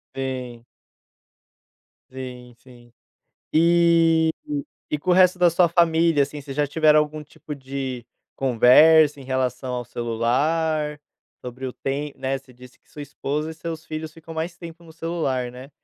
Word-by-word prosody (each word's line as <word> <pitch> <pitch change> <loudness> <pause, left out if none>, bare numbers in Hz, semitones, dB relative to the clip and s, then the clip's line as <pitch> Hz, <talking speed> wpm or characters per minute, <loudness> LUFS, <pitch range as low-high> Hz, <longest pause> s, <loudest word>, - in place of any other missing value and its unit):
Sim. 125 -3 -5 1.5
Sim, 125 -2 -9
sim. 120 -2 -18 0.6
E 165 -1 +4 0.6
e 150 - -1
com 180 +5 -5
o - - +6
resto 185 0 +5
da 180 -1 +5
sua 170 +1 +3
família, 165 -3 +3
assim, 150 +2 -7
vocês 135 -1 -8
já 150 0 +2
tiveram 155 +1 +4
algum 150 0 -2
tipo 150 0 -10
de 130 -3 -6 0.3
conversa 145 +5 +5
em 135 - -10
relação 130 -1 -2
ao 125 - -3
celular, 150 +7 -1 0.4
sobre 125 +1 -7
o 125 - -5
tem 140 +2 -4
né, 135 0 -2
você 130 -1 -18
disse 125 +1 -16
que - - -35
sua 150 - -10
esposa 145 +2 -4
e - - -8
seus 160 0 -7
filhos, 155 0 -6
ficam 165 0 -11
mais 165 +2 -4
tempo 170 0 -11
no 160 - -14
celular, 155 -7 -2
né. 130 +2 -11
145 Hz, 155 wpm, -23 LUFS, 130-160 Hz, 1.5 s, o